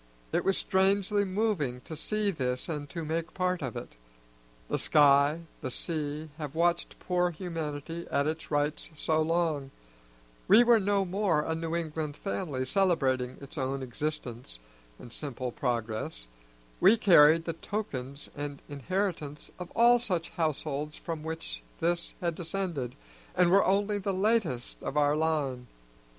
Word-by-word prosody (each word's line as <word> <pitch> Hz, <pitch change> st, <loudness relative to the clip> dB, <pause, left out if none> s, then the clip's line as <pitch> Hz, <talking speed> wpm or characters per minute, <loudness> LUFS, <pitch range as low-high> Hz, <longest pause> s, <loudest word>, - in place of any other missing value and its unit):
It -, -, +2 dB
was 195 Hz, -, +2 dB
strangely 200 Hz, +2 st, +2 dB
moving 185 Hz, -, 0 dB
to 160 Hz, -, -8 dB
see 210 Hz, +6 st, 0 dB
this 125 Hz, -6 st, -2 dB
and 150 Hz, -3 st, -4 dB
to 165 Hz, -3 st, -5 dB
make 165 Hz, +2 st, -3 dB
part 180 Hz, -1 st, 0 dB
of 130 Hz, -5 st, -4 dB
it. -, -, -7 dB, 0.7 s
The -, -, -1 dB
sky, 145 Hz, +1 st, +5 dB, 0.2 s
the 130 Hz, -, -3 dB
sea, 150 Hz, +2 st, -3 dB
have 150 Hz, -1 st, -5 dB
watched 170 Hz, +1 st, +1 dB
poor 180 Hz, -1 st, +1 dB
humanity 165 Hz, -1 st, -5 dB
at 140 Hz, -, +1 dB
its 160 Hz, +1 st, -3 dB
rites 145 Hz, 0 st, 0 dB
so 155 Hz, +1 st, +1 dB
long; 160 Hz, -4 st, 0 dB, 0.8 s
we 215 Hz, +5 st, +8 dB
were 235 Hz, -1 st, +6 dB
no 200 Hz, -1 st, +2 dB
more 180 Hz, -4 st, +1 dB
a 160 Hz, -, -1 dB
New 165 Hz, 0 st, -2 dB
England 155 Hz, -3 st, -3 dB
family 130 Hz, -, -2 dB
celebrating 130 Hz, -7 st, +1 dB
its 140 Hz, +2 st, -7 dB
own 135 Hz, 0 st, -1 dB
existence 125 Hz, -, -4 dB, 0.4 s
and 120 Hz, -, -11 dB
simple 130 Hz, -4 st, -4 dB
progress; 110 Hz, -, -2 dB, 0.5 s
we 195 Hz, +6 st, +7 dB
carried 165 Hz, -5 st, +6 dB
the 165 Hz, -, -1 dB
tokens 145 Hz, -8 st, -4 dB
and 145 Hz, -1 st, -5 dB
inheritance 150 Hz, 0 st, -3 dB
of 180 Hz, -1 st, -6 dB
all 240 Hz, +1 st, +6 dB
such 180 Hz, -8 st, -1 dB
households 150 Hz, -2 st, -2 dB
from 165 Hz, -2 st, -5 dB
which 160 Hz, -, -5 dB, 0.2 s
this 170 Hz, +1 st, 0 dB
had 170 Hz, -1 st, 0 dB
descended, 165 Hz, -7 st, -3 dB, 0.4 s
and 175 Hz, -1 st, +4 dB
were 200 Hz, +1 st, +6 dB
only 205 Hz, +2 st, +2 dB
the 195 Hz, -1 st, -1 dB
latest 190 Hz, -, 0 dB
of 145 Hz, -, -3 dB
our 145 Hz, 0 st, +4 dB
line. 145 Hz, -6 st, 0 dB
160 Hz, 145 wpm, -29 LUFS, 140-180 Hz, 0.8 s, we